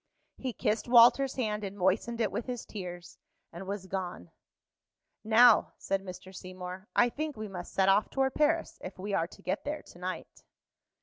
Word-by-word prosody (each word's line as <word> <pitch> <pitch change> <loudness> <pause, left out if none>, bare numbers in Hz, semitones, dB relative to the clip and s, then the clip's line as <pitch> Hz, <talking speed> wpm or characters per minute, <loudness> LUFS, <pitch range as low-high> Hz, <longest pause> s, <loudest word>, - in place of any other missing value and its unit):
He 260 - -3
kissed 220 0 -1
Walter's 245 +3 +6
hand 210 -4 -1
and 200 0 -5
moistened 205 +5 +1
it 210 -3 +1
with 235 - -4
his 245 -2 -4
tears, 175 -4 -8 0.3
and 180 +3 -8
was 200 -1 -4
gone. 180 - -5 0.9
"Now," 225 +1 +6
said 195 0 -1
Mr. 185 0 -10
Seymour, 185 +1 -8
"I 240 - +5
think 300 +2 -4
we 215 0 -5
must 180 -3 -7
set 190 0 +2
off 195 +2 +4
toward 265 -1 0
Paris, 315 +2 +1
if 185 - -7
we 200 +2 -4
are 165 -3 +1
to - - -16
get 185 - -2
there 300 +1 -4
to 175 - -16
night." 185 +1 -6
200 Hz, 180 wpm, -30 LUFS, 185-240 Hz, 0.9 s, Walter's